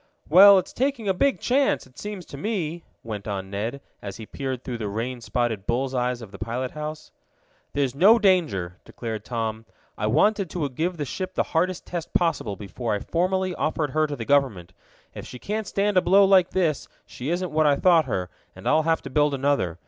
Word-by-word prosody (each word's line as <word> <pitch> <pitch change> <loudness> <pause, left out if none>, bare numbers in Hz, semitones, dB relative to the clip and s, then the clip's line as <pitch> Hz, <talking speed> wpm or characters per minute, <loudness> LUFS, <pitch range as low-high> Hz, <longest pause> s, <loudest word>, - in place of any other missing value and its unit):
"Well, 195 +5 +9
it's 185 - -2
taking 260 -4 -1
a 190 - +3
big 275 +9 +1
chance, 270 +2 +1
it 130 -1 -17
seems 205 -4 -6
to - - -10
me," 170 -1 -3 0.2
went 105 -3 -6
on 95 -2 -4
Ned, 115 +7 -3 0.2
as 100 -2 -7
he 110 - -8
peered 130 +1 -5
through 120 -3 -5
the 110 - -3
rain 120 +4 -4
spotted 115 -4 -2
bull's 130 +2 0
eyes 125 -1 -1
of 105 - -11
the 100 - -11
pilot 120 +3 -3
house. 150 0 -7 0.6
"There's 140 -3 0
no 200 +11 +6
danger," 135 - +1
declared 110 -3 -6
Tom. 110 -1 -4 0.3
"I 105 - 0
wanted 190 - +2
to 155 -3 -2
give 170 +7 -2
the 145 - -2
ship 185 +6 -5
the - - +2
hardest 180 +2 0
test 170 -2 -6
possible 165 - +1
before 105 +3 -4
I - - -2
formally 185 +2 0
offered 155 -3 -1
her 155 +2 +2
to 145 - -4
the 115 -4 -6
government. 110 -11 +1 0.4
If - - -8
she 125 - -9
can't 210 - -4
stand 200 0 0
a - - +6
blow 195 +3 +5
like 190 -2 +5
this 165 -6 0 0.2
she 130 +4 -6
isn't 175 0 -1
what 155 0 +3
I 145 - +4
thought 165 0 +4
her, 90 -7 -3 0.2
and - - -8
I'll 155 - +4
have 165 - +1
to - - -8
build 145 0 +2
another. 135 - 0
145 Hz, 210 wpm, -24 LUFS, 115-180 Hz, 0.6 s, Well